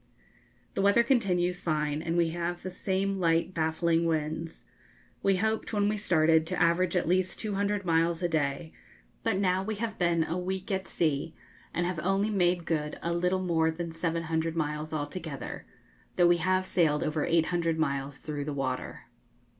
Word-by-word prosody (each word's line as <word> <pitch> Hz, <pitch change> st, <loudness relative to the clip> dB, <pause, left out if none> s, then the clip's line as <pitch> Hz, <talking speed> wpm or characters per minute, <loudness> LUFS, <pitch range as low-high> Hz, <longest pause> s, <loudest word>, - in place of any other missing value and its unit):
The -, -, -1 dB
weather 200 Hz, +4 st, +5 dB
continues 180 Hz, -8 st, +1 dB
fine, 150 Hz, -2 st, -1 dB
and 165 Hz, +1 st, -1 dB
we 170 Hz, -1 st, +3 dB
have 175 Hz, +1 st, -3 dB
the 185 Hz, -, -4 dB
same 195 Hz, +1 st, -1 dB
light 165 Hz, +1 st, +2 dB
baffling 165 Hz, +1 st, +1 dB
winds. 160 Hz, +1 st, -3 dB, 0.6 s
We 195 Hz, -1 st, +3 dB
hoped, 220 Hz, +4 st, -1 dB
when 205 Hz, -1 st, +2 dB
we 215 Hz, -, 0 dB
started, 160 Hz, -5 st, +3 dB
to -, -, -2 dB
average 175 Hz, +2 st, +2 dB
at 180 Hz, -, +1 dB
least 185 Hz, +1 st, +1 dB
200 205 Hz, -1 st, -1 dB
miles 165 Hz, +1 st, +2 dB
a -, -, +3 dB
day, 155 Hz, -1 st, -1 dB, 0.5 s
but 225 Hz, -4 st, 0 dB
now 185 Hz, -1 st, +2 dB
we 215 Hz, +3 st, -3 dB
have 220 Hz, 0 st, -4 dB
been 170 Hz, -2 st, +2 dB
a 165 Hz, +3 st, -2 dB
week 190 Hz, +2 st, -4 dB
at 190 Hz, 0 st, -1 dB
sea, 155 Hz, -1 st, -1 dB, 0.4 s
and 175 Hz, -, -1 dB
have 175 Hz, -2 st, -2 dB
only 195 Hz, +5 st, +1 dB
made 180 Hz, -3 st, +2 dB
good 150 Hz, -3 st, -2 dB
a 170 Hz, -, 0 dB
little 180 Hz, +2 st, +1 dB
more 165 Hz, -2 st, +2 dB
than 165 Hz, +1 st, -4 dB
700 165 Hz, 0 st, -1 dB
miles 150 Hz, -1 st, -2 dB
altogether, 150 Hz, -2 st, -5 dB, 0.5 s
though 175 Hz, -, +4 dB
we 175 Hz, 0 st, +5 dB
have 185 Hz, +2 st, +1 dB
sailed 155 Hz, -6 st, +2 dB
over 155 Hz, 0 st, -1 dB
800 165 Hz, 0 st, +1 dB
miles 140 Hz, -3 st, -1 dB
through 150 Hz, -2 st, -5 dB
the 150 Hz, -, -3 dB
water. 130 Hz, -2 st, -3 dB
170 Hz, 170 wpm, -29 LUFS, 160-185 Hz, 0.6 s, weather